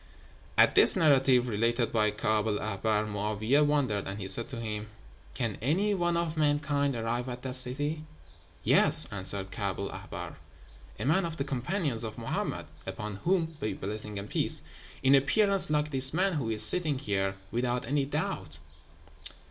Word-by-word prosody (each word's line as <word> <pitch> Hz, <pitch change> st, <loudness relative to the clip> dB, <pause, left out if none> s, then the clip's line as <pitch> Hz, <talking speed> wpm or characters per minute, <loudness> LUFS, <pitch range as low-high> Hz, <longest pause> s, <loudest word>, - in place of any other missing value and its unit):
"At -, -, +4 dB
this -, -, +7 dB
narrative, 135 Hz, -7 st, +2 dB
related 115 Hz, +2 st, -1 dB
by 110 Hz, -2 st, +1 dB
Kaab 105 Hz, +1 st, -1 dB
el 105 Hz, -1 st, -1 dB
Ahbár, 105 Hz, +1 st, -2 dB
Mo'áwiyeh 105 Hz, +7 st, -1 dB
wondered, 135 Hz, -9 st, -1 dB
and 95 Hz, +2 st, -7 dB
he 95 Hz, -, -6 dB
said 115 Hz, +5 st, +3 dB
to 130 Hz, -4 st, -7 dB
him, 105 Hz, -2 st, -6 dB, 0.5 s
'Can 115 Hz, -5 st, -4 dB
any 185 Hz, -, 0 dB
one 175 Hz, -3 st, -1 dB
of 170 Hz, -1 st, -3 dB
mankind 145 Hz, -2 st, -1 dB
arrive 120 Hz, +2 st, -4 dB
at 125 Hz, 0 st, -8 dB
that 130 Hz, -1 st, -5 dB
city?' 145 Hz, +5 st, +4 dB, 0.6 s
'Yes,' -, -, +6 dB
answered 95 Hz, 0 st, +2 dB
Kaab 100 Hz, -2 st, -4 dB
el 100 Hz, -, -5 dB
Ahbár; -, -, -9 dB, 0.6 s
'a 105 Hz, -, -5 dB
man 160 Hz, +7 st, +1 dB
of 165 Hz, -1 st, -6 dB
the 140 Hz, -, -2 dB
companions 140 Hz, -, -3 dB
of 110 Hz, -1 st, -7 dB
Mohammed -, -, -5 dB, 0.2 s
(upon 105 Hz, -2 st, -7 dB
whom 165 Hz, -, -2 dB
be 110 Hz, -, -4 dB
blessing 105 Hz, +1 st, -5 dB
and 100 Hz, +1 st, -7 dB
peace!), -, -, +5 dB, 0.4 s
in 135 Hz, +1 st, +3 dB
appearance 195 Hz, +9 st, +3 dB
like 150 Hz, 0 st, -1 dB
this 130 Hz, +1 st, +5 dB
man 190 Hz, +2 st, 0 dB
who 135 Hz, -8 st, -3 dB
is 110 Hz, -1 st, +3 dB
sitting 155 Hz, +3 st, +3 dB
here, 95 Hz, -6 st, -3 dB, 0.2 s
without 120 Hz, +1 st, -3 dB
any 140 Hz, +3 st, -1 dB
doubt.' 135 Hz, -, -5 dB
125 Hz, 165 wpm, -27 LUFS, 105-150 Hz, 0.6 s, this